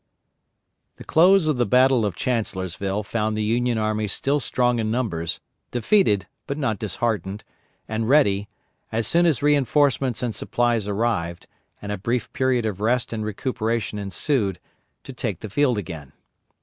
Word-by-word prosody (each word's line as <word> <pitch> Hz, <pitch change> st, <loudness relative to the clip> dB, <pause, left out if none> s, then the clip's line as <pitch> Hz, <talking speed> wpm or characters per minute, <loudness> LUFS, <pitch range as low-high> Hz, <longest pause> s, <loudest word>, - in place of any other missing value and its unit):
The -, -, -11 dB
close 180 Hz, +2 st, +5 dB
of 155 Hz, -4 st, +1 dB
the 120 Hz, -, +2 dB
battle 125 Hz, -1 st, +4 dB
of 95 Hz, -, -4 dB
Chancellorsville 100 Hz, -4 st, -2 dB
found 110 Hz, +1 st, -1 dB
the 110 Hz, -, 0 dB
Union 120 Hz, +2 st, +1 dB
army 110 Hz, 0 st, 0 dB
still 140 Hz, +8 st, 0 dB
strong 125 Hz, -2 st, +1 dB
in 110 Hz, -1 st, -1 dB
numbers, 105 Hz, -9 st, -1 dB, 0.3 s
defeated, 120 Hz, -, +2 dB, 0.2 s
but 140 Hz, -, -3 dB
not 115 Hz, -9 st, -1 dB
disheartened, 105 Hz, -2 st, -2 dB, 0.4 s
and 110 Hz, +1 st, -2 dB
ready, 105 Hz, -9 st, +3 dB, 0.4 s
as 115 Hz, 0 st, 0 dB
soon 170 Hz, +8 st, +3 dB
as 145 Hz, -5 st, +1 dB
reinforcements 140 Hz, -3 st, +2 dB
and 120 Hz, -2 st, -1 dB
supplies 120 Hz, -3 st, 0 dB
arrived, 100 Hz, -5 st, -1 dB, 0.4 s
and 105 Hz, -, -4 dB
a 105 Hz, -, -3 dB
brief 115 Hz, +3 st, -2 dB
period 130 Hz, -3 st, +1 dB
of 105 Hz, -2 st, -3 dB
rest 120 Hz, +2 st, +1 dB
and 110 Hz, -1 st, -3 dB
recuperation 110 Hz, -1 st, -2 dB
ensued, 100 Hz, -, -1 dB, 0.4 s
to 135 Hz, -, -9 dB
take 115 Hz, -8 st, -4 dB
the 110 Hz, -, -7 dB
field 130 Hz, 0 st, +2 dB
again. 80 Hz, -8 st, -7 dB
115 Hz, 150 wpm, -23 LUFS, 105-130 Hz, 0.4 s, close